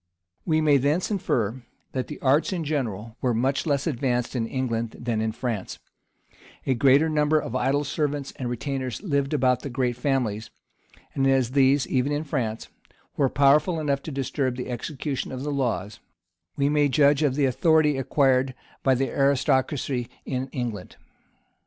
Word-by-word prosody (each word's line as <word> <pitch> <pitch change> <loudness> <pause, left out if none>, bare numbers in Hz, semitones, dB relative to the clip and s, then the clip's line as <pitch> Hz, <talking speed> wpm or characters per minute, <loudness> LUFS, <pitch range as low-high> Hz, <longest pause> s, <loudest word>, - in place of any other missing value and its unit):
We 155 -1 +3
may 150 -2 +5
thence 145 - 0
infer, 125 - -1 0.3
that 130 -1 -3
the 150 - -8
arts 140 +7 +3
in 175 -3 -2
general 115 -7 -3
were 125 -3 +1
much 135 +6 0
less 140 -2 +1
advanced 125 -5 -1
in 115 -2 -1
England 115 -3 -2
than 115 -2 -1
in 110 0 0
France: 115 -4 -4 0.9
a 135 - +2
greater 135 +5 +4
number 155 0 +2
of 120 - -5
idle 135 +3 +1
servants 145 -1 -2
and 125 -2 -3
retainers 130 - -4
lived 140 -7 0
about 130 -4 +2
the 140 - -5
great 125 -1 -1
families; 120 -5 -1 0.6
and 135 -1 +1
as 135 -3 +2
these, 135 0 +4
even 130 +2 0
in 145 +1 -1
France, 120 -8 -3 0.5
were 135 -2 +2
powerful 150 +5 +3
enough 140 -3 0
to 155 - -7
disturb 135 -1 -1
the 125 0 -5
execution 135 +3 -4
of 130 0 -5
the 150 - -2
laws, 110 -8 -2 0.6
we 140 -1 +2
may 145 0 +3
judge 145 +1 +4
of 140 -4 +2
the 145 -1 +2
authority 150 +3 +3
acquired 135 -1 +2 0.3
by 135 -1 +3
the 135 +2 0
aristocracy 135 -2 +1 0.2
in 130 0 -3
England. 120 -7 -5
135 Hz, 165 wpm, -25 LUFS, 125-145 Hz, 0.9 s, may